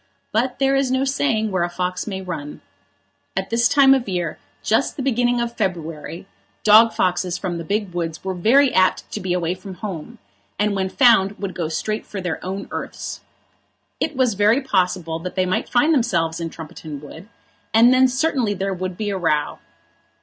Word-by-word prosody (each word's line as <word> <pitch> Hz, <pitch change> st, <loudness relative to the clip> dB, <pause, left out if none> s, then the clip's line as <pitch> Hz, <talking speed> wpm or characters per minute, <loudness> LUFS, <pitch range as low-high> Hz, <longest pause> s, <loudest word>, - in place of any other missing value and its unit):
But 245 Hz, +4 st, 0 dB
there 270 Hz, 0 st, +2 dB
is 270 Hz, -1 st, +1 dB
no 260 Hz, +1 st, +1 dB
saying 235 Hz, -6 st, 0 dB
where 185 Hz, -2 st, 0 dB
a 175 Hz, -, 0 dB
fox 180 Hz, +2 st, -3 dB
may 190 Hz, -2 st, -4 dB
run. 150 Hz, -5 st, -6 dB, 0.8 s
At -, -, -2 dB
this 235 Hz, +1 st, +4 dB
time 270 Hz, -2 st, +6 dB
of 265 Hz, -3 st, +1 dB
the 195 Hz, -, -4 dB
year, 175 Hz, -2 st, -2 dB, 0.2 s
just -, -, +1 dB
the 270 Hz, -, -3 dB
beginning 245 Hz, -1 st, +1 dB
of 235 Hz, 0 st, -2 dB
February, 165 Hz, -4 st, -4 dB, 0.4 s
dog 220 Hz, +2 st, +7 dB
foxes 180 Hz, -1 st, 0 dB
from 175 Hz, -3 st, -3 dB
the -, -, -5 dB
big 200 Hz, +1 st, -2 dB
woods 165 Hz, -2 st, -4 dB
were 190 Hz, 0 st, -2 dB
very 245 Hz, +10 st, +4 dB
apt 185 Hz, 0 st, +2 dB
to -, -, -4 dB
be 185 Hz, -1 st, -3 dB
away 175 Hz, -1 st, 0 dB
from 190 Hz, 0 st, -9 dB
home, 195 Hz, +4 st, -7 dB, 0.4 s
and 210 Hz, -1 st, +1 dB
when 190 Hz, -1 st, -1 dB
found 210 Hz, -5 st, +4 dB
would 195 Hz, -2 st, -4 dB
go 170 Hz, -3 st, -2 dB
straight 215 Hz, +7 st, -3 dB
for 205 Hz, -, -6 dB
their 180 Hz, -3 st, -4 dB
own 195 Hz, +2 st, -5 dB
earths. -, -, -6 dB, 0.8 s
It 300 Hz, -, -1 dB
was 255 Hz, -3 st, +2 dB
very 210 Hz, +6 st, +3 dB
possible 180 Hz, -, 0 dB
that 180 Hz, +2 st, -6 dB
they 185 Hz, -1 st, +2 dB
might 185 Hz, -, -1 dB
find 300 Hz, +7 st, +3 dB
themselves 175 Hz, -, +1 dB
in 165 Hz, -1 st, -3 dB
Trumpeton 160 Hz, -2 st, -9 dB
Wood, 150 Hz, +8 st, -12 dB, 0.4 s
and 235 Hz, +3 st, +6 dB
then 260 Hz, 0 st, +5 dB
certainly 255 Hz, -5 st, 0 dB
there 195 Hz, +1 st, -2 dB
would 185 Hz, -1 st, -4 dB
be 210 Hz, -1 st, -2 dB
a 195 Hz, -, -2 dB
row. 150 Hz, -4 st, 0 dB
195 Hz, 195 wpm, -21 LUFS, 180-235 Hz, 0.8 s, dog